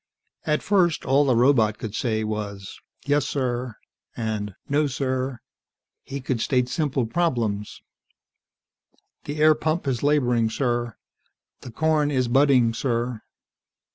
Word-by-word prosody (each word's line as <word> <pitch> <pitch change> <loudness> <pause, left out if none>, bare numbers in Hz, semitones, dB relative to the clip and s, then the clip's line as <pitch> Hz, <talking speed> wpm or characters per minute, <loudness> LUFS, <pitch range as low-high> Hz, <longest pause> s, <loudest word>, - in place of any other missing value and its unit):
At 150 0 +1
first, 180 -5 +2
all 140 +3 +3
the 130 -3 +3
robot 115 -4 +3
could 110 -3 -6
say 110 -2 -1
was 105 -2 -5 0.3
"Yes, 145 -1 +1
sir," 125 -3 -2 0.4
and 105 -4 -3
"No, 145 +1 +2
sir." 130 -1 -2 0.6
He 140 0 -7
could 125 -3 -2
state 125 -1 +1
simple 135 -2 0
problems: 115 -7 -2 1.4
"The 145 +1 -5
air 155 +1 +6
pump 155 +2 -2
is 125 -4 -1
laboring, 125 -6 +2
sir." 120 -1 -1 0.6
"The - - -10
corn 155 +2 +1
is 130 -4 0
budding, 130 -2 +4
sir." 120 -1 -2
130 Hz, 125 wpm, -24 LUFS, 115-145 Hz, 1.4 s, air